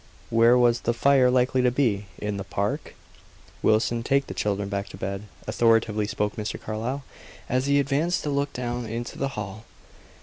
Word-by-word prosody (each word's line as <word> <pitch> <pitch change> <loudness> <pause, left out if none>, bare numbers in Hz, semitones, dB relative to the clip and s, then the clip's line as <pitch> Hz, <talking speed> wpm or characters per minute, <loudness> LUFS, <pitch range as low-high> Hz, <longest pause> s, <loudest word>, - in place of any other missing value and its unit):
Where 115 +2 +6
was 120 -1 +3
the 120 - 0
fire 135 0 +4
likely 125 +1 +2
to 125 - +4
be 115 -6 0
in 105 -1 -3
the 100 - -4
park?" 100 +1 -3 0.7
"Wilson 115 +2 +2
take 140 +3 +1
the - - -7
children 100 -1 -1
back 100 0 -3
to - - -10
bed," 100 +2 -4 0.2
authoritatively 110 -2 +2
spoke 105 0 -2
Mr. 105 -1 -4
Carlyle, 115 +6 -4 0.4
as 130 +2 0
he 140 0 +4
advanced 145 +6 0
to 150 - -1
look 140 0 0
down 120 -1 -3
into 115 +2 -5
the 135 - 0
hall. 105 +1 -5
115 Hz, 175 wpm, -25 LUFS, 105-130 Hz, 0.7 s, Where